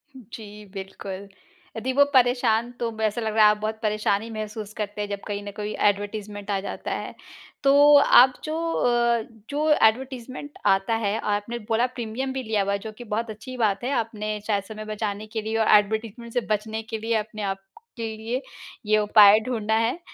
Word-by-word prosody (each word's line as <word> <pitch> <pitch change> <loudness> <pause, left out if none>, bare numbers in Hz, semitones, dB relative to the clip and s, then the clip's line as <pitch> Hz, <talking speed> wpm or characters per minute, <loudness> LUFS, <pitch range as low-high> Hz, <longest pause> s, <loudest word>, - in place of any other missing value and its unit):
जी, 210 -3 -11
बिल्कुल। 195 0 -7 0.5
यदि 255 +4 -2
वो 285 +1 +6
परेशान 245 -2 +3
तो 235 - -1
ब 220 - -8
ऐसा 220 +2 0
लग 220 -1 -2
रहा 215 - +6
है 210 - +8
आप 210 - -1
बहुत 220 0 -3
परेशानी 215 0 0
महसूस 215 -1 -6
करते 210 -1 -4
हैं 205 - -4
जब 200 -1 -3
कहीं 205 -1 -4
ना 205 - -6
कोई 210 0 -3 0.2
एडवर्टाइजमेंट 205 0 -5
आ 195 - +1
जाता - - -5
है। - - -5 0.5
तो 275 0 +5 0.5
आप 255 +1 +5
जो 310 0 -3 0.2
अ, 235 -1 +2 0.3
जो 300 +2 0
एडवर्टाइजमेंट 260 +2 +1 0.2
आता 195 +4 0
है, 205 +2 0
आपने 210 +3 -2
बोला 230 +2 +3
प्रीमियम 240 +4 -3
भी 265 -1 -3
लिया 215 -2 0
हुआ 200 - -1
है 200 - -1
जो - - -6
कि 240 - -8
बहुत 230 +1 -2
अच्छी 255 +5 -8
बात 200 +1 -1
है 255 - -1
आपने 215 -1 -4
शायद 200 -2 +1
समय 215 0 -8
बचाने 210 0 -3
के 220 - 0
लिए 220 +1 -2
और 220 - +2
एडवर्टाइजमेंट 220 +3 -3
से 245 - +1
बचने 220 +1 -5
के - - 0
लिए 225 +1 -2
अपने 215 0 -3
आपके 225 - -9
लिए 235 +4 -3 0.4
ये 215 0 +3
उपाय 210 0 +7
ढूँढा 220 -3 -1
है। 230 +9 +1
220 Hz, 195 wpm, -24 LUFS, 210-235 Hz, 0.5 s, है